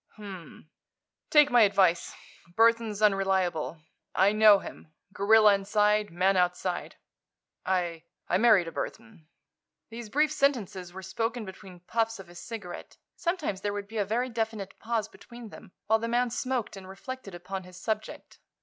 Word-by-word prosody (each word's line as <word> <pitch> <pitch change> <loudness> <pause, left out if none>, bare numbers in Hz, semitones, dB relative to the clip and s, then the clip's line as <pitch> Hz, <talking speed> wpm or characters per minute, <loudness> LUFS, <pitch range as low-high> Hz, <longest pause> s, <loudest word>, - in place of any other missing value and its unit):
"H - - -23
m - - -8
m. 180 -5 -11 0.6
Take 295 -1 +6
my 245 -1 +6
advice. 190 -5 +3 0.4
Burthon's 225 -2 +3
unreliable. 190 -6 +1 0.3
I 195 +2 +4
know 215 -1 +7
him. 160 - -10 0.2
Gorilla 215 +1 +5
inside, 210 +1 +1
man 185 +3 +2
outside. 180 0 -1 0.7
I—I 170 -3 -2
married 215 -6 +5
a - - -5
Burthon." 215 -8 -7 0.6
These 230 -1 -8
brief 300 +5 +2
sentences 230 - -1
were 190 +1 -9
spoken 225 +4 -3
between 190 -2 -12
puffs 225 +4 -1
of 190 -3 -12
his 175 0 -11
cigarette. 220 -7 -8 0.2
Sometimes 315 - -2
there 205 0 -2
would 205 -1 -5
be 220 +2 -8
a - - +3
very 235 +6 -1
definite 220 -4 -4
pause 225 -2 -2
between 235 0 -12
them, 205 -2 -13
while 220 +1 +3
the 230 - -3
man 240 +1 +1
smoked 255 -3 -2
and 190 -1 -11
reflected 200 0 -8
upon 190 +2 -6
his 180 0 -14
subject. 215 +2 -5
205 Hz, 155 wpm, -28 LUFS, 185-230 Hz, 0.7 s, know